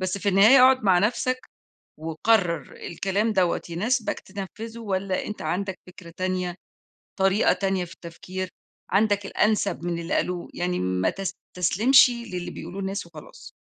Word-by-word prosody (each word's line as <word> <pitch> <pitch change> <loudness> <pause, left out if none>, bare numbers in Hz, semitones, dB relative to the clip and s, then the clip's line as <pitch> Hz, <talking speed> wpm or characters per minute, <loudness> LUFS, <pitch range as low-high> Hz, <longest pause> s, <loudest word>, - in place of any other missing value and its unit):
بس 185 +1 -2
في 200 - -1
النهاية 210 +7 +7
أقعُد 260 -1 +5
مع 185 -3 +5
نفْسك 245 +5 0 0.6
وقرّر 170 0 +1
الكلام 195 +6 -1
دَوَّة 180 -3 +2
يناسبك 215 +7 -1
تنفّذه 210 +4 -8
والّا 195 -3 -2
أنت 210 - -6
عندك 185 +4 -3
فكرة 175 -2 -13
تانية، 185 -1 -2 0.6
طريقة 195 +3 +4
تانية 190 -1 -1
في 170 - -12
التفكير، 185 +2 -7 0.4
عندك 205 0 +2
الأنسب 205 -4 0
من 170 -1 -2
اللي 170 - -4
قالوه 180 -1 -1
يعني 180 0 -2
ما 90 0 0
تستسلمشِ 195 +6 +3
للي 230 -8 -5
بيقولوه 195 - -8
الناس 195 0 -3
وخلاص. 160 -3 -13
190 Hz, 140 wpm, -25 LUFS, 175-210 Hz, 0.6 s, النهاية